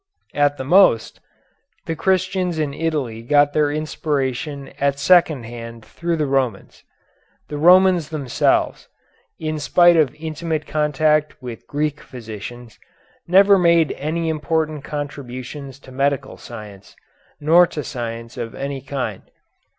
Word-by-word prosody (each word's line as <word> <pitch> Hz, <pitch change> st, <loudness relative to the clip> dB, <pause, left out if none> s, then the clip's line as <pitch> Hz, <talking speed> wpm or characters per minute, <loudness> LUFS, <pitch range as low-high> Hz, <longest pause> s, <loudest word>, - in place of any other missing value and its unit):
At 145 Hz, 0 st, +2 dB
the -, -, -4 dB
most, 150 Hz, -, +4 dB, 0.7 s
the 165 Hz, -, -3 dB
Christians 185 Hz, -1 st, 0 dB
in 150 Hz, -3 st, -1 dB
Italy 145 Hz, -8 st, -2 dB
got 145 Hz, +4 st, +3 dB
their 150 Hz, -1 st, +2 dB
inspiration 145 Hz, -2 st, -3 dB
at 140 Hz, 0 st, +1 dB
second 155 Hz, -3 st, +4 dB
hand 115 Hz, -1 st, -9 dB
through 170 Hz, -1 st, -3 dB
the 155 Hz, -, 0 dB
Romans. 130 Hz, -7 st, -2 dB, 0.7 s
The 150 Hz, -, -5 dB
Romans 180 Hz, -1 st, +5 dB
themselves, 145 Hz, -7 st, 0 dB, 0.5 s
in 155 Hz, -1 st, -3 dB
spite 175 Hz, +3 st, +5 dB
of 150 Hz, -4 st, +2 dB
intimate 160 Hz, 0 st, -4 dB
contact 150 Hz, 0 st, +1 dB
with 125 Hz, -4 st, -9 dB
Greek 150 Hz, 0 st, -2 dB
physicians, 120 Hz, -1 st, -9 dB, 0.5 s
never 195 Hz, +2 st, +6 dB
made 170 Hz, -3 st, +4 dB
any 160 Hz, +3 st, -3 dB
important 155 Hz, -1 st, -1 dB
contributions 140 Hz, -1 st, -7 dB
to 130 Hz, -, -14 dB
medical 140 Hz, +1 st, -1 dB
science, 105 Hz, -4 st, -11 dB, 0.4 s
nor 165 Hz, +4 st, +5 dB
to 150 Hz, -, -5 dB
science 115 Hz, -2 st, -6 dB
of 115 Hz, -2 st, -5 dB
any 140 Hz, -1 st, -4 dB
kind. 130 Hz, -7 st, -5 dB
145 Hz, 125 wpm, -20 LUFS, 130-160 Hz, 0.7 s, never